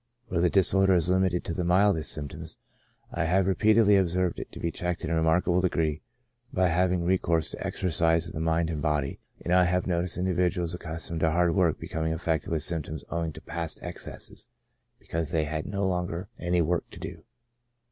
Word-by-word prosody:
Where 90 -4 0
the 90 - +4
dis 95 -1 +4
order 95 -1 +4
is 85 0 +2
limited 95 -1 +2
to - - -4
the 90 - -2
mildest 90 -2 +3
symptoms, 75 -2 -6 0.5
I 85 -1 -1
have 90 +3 +2
repeatedly 105 +1 +4
observed 90 -1 +1
it - - -7
to - - -9
be 85 - -1
checked 90 +1 -3
in 80 - -2
a - - +2
remarkable 85 +2 +2
degree 80 -4 0 0.5
by 90 -1 +2
having 90 +1 +1
recourse 85 -3 +1
to - - -6
exercise 85 -1 +1
of 85 - -8
the - - -4
mind 80 +1 +1
and 75 -2 -3
body, 75 -3 -1 0.3
and 85 - +1
I 90 0 +6
have 90 +1 +1
no 85 -2 +1
ticed 90 -1 -3
individuals 90 -1 0
accustomed 85 -1 -5
to 80 - +3
hard 85 +1 +2
work 90 -5 +2
become 80 0 -3
affected 80 -1 -1
with 80 -3 0
symptoms 80 -2 -2
owing 85 -1 -1
to - - -11
past 85 -1 -3
excesses, - - -6 0.5
because 80 -2 -3
they 80 -1 +1
had 80 0 -3
no 100 0 -1
longer 90 0 -2
any 85 0 +1
work 85 +2 -1
to - - -12
do. - - -8
85 Hz, 200 wpm, -27 LUFS, 80-90 Hz, 0.5 s, I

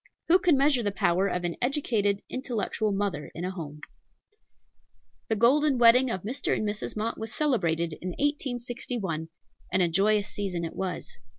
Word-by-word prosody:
Who 360 +3 +7
can 345 -6 +4
measure 275 -2 +3
the 205 -3 -1
power 190 -1 +2
of 180 -2 -2
an 175 -1 -2
educated, 225 -7 0
intellectual 230 -4 -2
mother 195 -6 -2
in 170 - -4
a 185 - -2
home? 150 -5 -8 1.5
The 220 - +1
golden 270 +5 +4
wedding 245 +2 +6
of 190 -6 -3
Mr. 245 +7 -1
and 215 - -1
Mrs. 210 +1 -4
Mott 225 +2 -2
was 220 0 -5
celebrated 170 - 0
in 185 - -3
1861, 245 - -3 0.4
and 185 - +2
a - - +3
joyous 200 +4 +2
season 185 -5 -3
it 165 - -7
was. 185 -8 -5
210 Hz, 165 wpm, -27 LUFS, 185-250 Hz, 1.5 s, Who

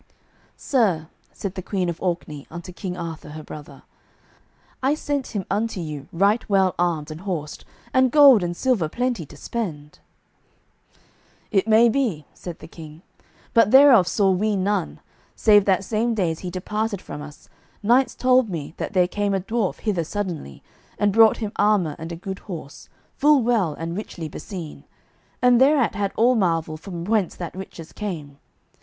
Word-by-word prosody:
"Sir," 190 - +1 0.2
said 195 -2 -5
the 190 - -5
Queen 185 -1 -2
of 170 -1 -4
Orkney 170 -5 -3
unto 170 +2 -8
King 180 0 -5
Arthur, 165 -3 -6
her 155 +1 -8
brother, 150 -1 -11 1.0
"I 270 +3 +2
sent 290 -3 -2
him 195 -3 -2
unto 210 0 -1
you 150 -4 -6
right 200 +6 +2
well 190 -2 +3
armed 165 -3 0
and 155 +2 -8
horsed, 170 -6 -5 0.3
and 260 0 +4
gold 275 -6 +7
and 175 -1 -3
silver 235 -12 +1
plenty 240 - -2
to - - -14
spend." 150 -11 -5 1.5
"It 200 -1 +2
may 225 +2 +6
be," 225 - 0
said 175 -3 -8
the - - -12
King, 160 0 -12 0.5
"but 230 -3 +5
thereof 265 -7 +7
saw 195 +1 +2
we 205 +3 +1
none, 185 - -1 0.3
save 205 -2 +5
that 195 -1 +2
same 225 +3 0
day 185 -6 +1
as 160 - -6
he 180 - -5
departed 210 +3 -3
from 150 - -8
us, 150 0 -12 0.4
knights 245 +4 +3
told 255 -2 +3
me 160 -5 -5
that - - -4
there 180 -2 +3
came 205 +1 -1
a - - +1
dwarf 210 +1 -2
hither 195 -6 0
suddenly, 170 - -5 0.3
and 205 -1 +2
brought 225 0 +6
him 215 -3 -4
armour 200 -7 +2
and 160 +2 -6
a - - -4
good 190 +3 -6
horse, 165 -7 -9 0.3
full 290 -2 +4
well 215 -10 +1
and 165 +1 -5
richly 180 -5 -6
beseen, 165 0 -8 0.6
and 250 0 +5
thereat 270 -3 +4
we - - -7
had 200 -1 0
all 240 +3 +4
marvel 165 -7 0
from 170 +1 -7
whence 210 -3 +1
that 175 -2 -6
riches 180 -4 -9
came. 155 -9 -6
190 Hz, 170 wpm, -23 LUFS, 165-220 Hz, 1.5 s, gold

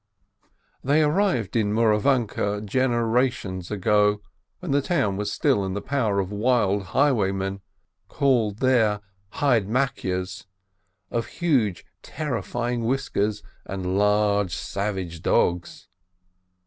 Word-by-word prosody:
They 145 +3 +3
arrived 150 - +1
in 105 -2 +1
Mouravanke 110 -2 +1
generations 120 -5 0
ago, 105 0 +2 0.4
when 180 -5 -5
the 140 +1 +3
town 135 - 0
was 105 +1 -3
still 100 - +1
in 95 0 -3
the - - -1
power 115 -8 0
of 95 0 -2
wild 105 -3 +1
highwaymen, 100 -8 +1 0.5
called 120 -7 +1
there 115 -6 +3 0.3
"Hydemakyes," 115 -7 0 0.6
with 115 -1 -1
huge, 125 - 0 0.2
terrifying 120 -3 -3
whiskers 115 -4 -1 0.2
and 95 -1 -3
large, 105 -2 +2
savage 95 -5 -4
dogs. 90 -1 0
105 Hz, 100 wpm, -24 LUFS, 100-130 Hz, 0.6 s, They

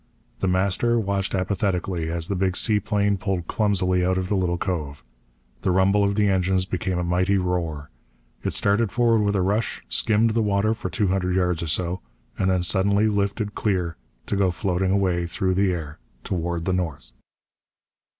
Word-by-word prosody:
The 95 - 0
Master 95 +6 +2
watched 100 -2 -1
apathetically 95 -3 -1
as 85 0 -1
the 100 - -2
big 95 0 0
seaplane 105 -2 +1
pulled 95 -3 -2
clumsily 95 -4 +1
out 90 +1 +1
of 95 -1 -2
the 105 - +1
little 90 -2 0
cove. 75 -7 -4 0.6
The - - 0
rumble 95 +2 +3
of 100 0 +1
the 105 0 +2
engines 95 -1 +1
became 95 -1 -2
a 90 - -1
mighty 90 +3 +1
roar. 85 -6 -2 0.5
It - - -1
started 100 +1 +1
forward 115 -1 +3
with 100 0 +1
a 95 - +2
rush, 105 +4 -1
skimmed 110 +1 +2
the 115 +1 +1
water 105 +1 +1
for 115 - -5
two 105 -5 0
hundred 90 -1 0
yards 90 -3 +1
or 85 - -3
so, 85 +3 -1 0.3
and 95 -2 +1
suddenly 100 +3 +2
lifted 105 +1 -1
clear 90 -6 -1 0.3
to - - -2
go 100 -1 +2
floating 90 +1 -1
away 90 -3 +1
through 95 +2 0
the 95 0 +2
air 80 -4 -5 0.2
toward 85 -2 -2
the 95 - 0
north. 85 -6 -3
95 Hz, 175 wpm, -24 LUFS, 90-100 Hz, 0.6 s, rumble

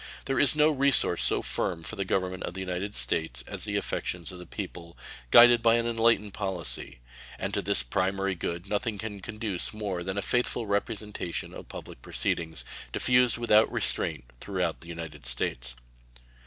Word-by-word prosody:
There 135 - 0
is 145 - +6
no 150 +1 +4
resource 140 - +4
so - - +3
firm 80 - -2
for 110 - -3
the 100 - -2
Government 95 -1 -1
of 85 - -5
the - - -5
United 95 +2 -4
States 60 +1 +1
as - - -4
the - - -3
affections 85 -3 -2
of 90 - -10
the 90 - -11
people, 90 -4 -8 0.3
guided 120 - +8
by 115 0 +5
an 115 0 0
enlightened 115 -3 +2
policy; 95 - -2 0.4
and - - -4
to - - 0
this - - +1
primary 95 +9 -1
good 85 +1 -4
nothing 105 +1 -2
can 105 0 -6
conduce 105 -1 -2
more 100 -4 -3
than 95 +2 -4
a 100 - 0
faithful 120 0 0
representation 100 -3 -3
of - - -10
public - - -9
proceedings, 80 +4 -2 0.3
diffused 125 -1 +3
without 110 -2 +4
restraint - - +1 0.2
throughout 90 -5 -2
the 85 - -10
United 80 -6 -7
States. - - -3
95 Hz, 170 wpm, -28 LUFS, 85-110 Hz, 0.4 s, guided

